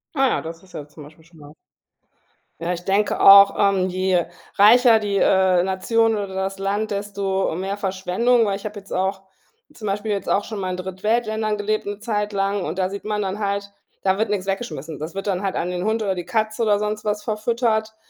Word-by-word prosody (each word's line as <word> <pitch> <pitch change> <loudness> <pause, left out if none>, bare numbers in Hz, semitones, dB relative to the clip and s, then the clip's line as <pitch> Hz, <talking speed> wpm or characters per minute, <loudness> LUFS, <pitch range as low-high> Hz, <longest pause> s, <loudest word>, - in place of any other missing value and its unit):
Ah, 270 -2 +2
das 165 +1 -8
ist 185 - -20
ja 145 - -7
zum 150 0 -13
Beispiel 155 +2 -16
schon 170 -1 -20
was. 145 +1 -13 1.1
Ja, 175 +2 -1
ich 175 - -7
denke 200 +2 +1
auch, 200 0 +8
ähm, 195 -2 +2
je 185 -1 0 0.3
reicher 225 +2 +6
die, 200 -2 -1
äh, 190 -2 +3
Nation 225 +5 +1
oder 205 -1 -3
das 195 0 -3
Land, 205 +2 -2
desto 200 -3 -2
mehr 195 +2 -3
Verschwendung, 205 +5 +1
weil 200 -2 0
ich 200 - -9
habe 210 - -9
jetzt 195 - -11
auch 190 +1 -1 0.5
zum 215 -6 -7
Beispiel 205 +2 -2
jetzt 200 - -3
auch 205 - +2
schon 215 -2 -6
mal 185 -1 -3
in 180 - -3
Drittweltländern 215 +3 -1
gelebt 210 0 -2
'ne 205 0 -4
Zeit 210 -1 -2
lang 195 0 0
und 165 +2 -4
da 185 -1 0
sieht 200 - -6
man 210 -1 -2
dann 195 +2 -4
halt, 200 -1 -2 0.3
da 190 +1 +1
wird 220 - 0
nix 195 -2 -1
weggeschmissen. 180 - -4
Das 155 +4 -6
wird 195 - -4
dann 190 -3 -1
halt 195 -2 -2
an 180 +1 -2
den 180 0 -3
Hund 220 0 0
oder 195 -2 0
die 175 -2 -6
Katze 220 +2 -1
oder 210 -2 +3
sonst 210 +1 -3
was 210 0 -2
verfüttert. 220 0 -1
200 Hz, 215 wpm, -22 LUFS, 190-215 Hz, 1.1 s, auch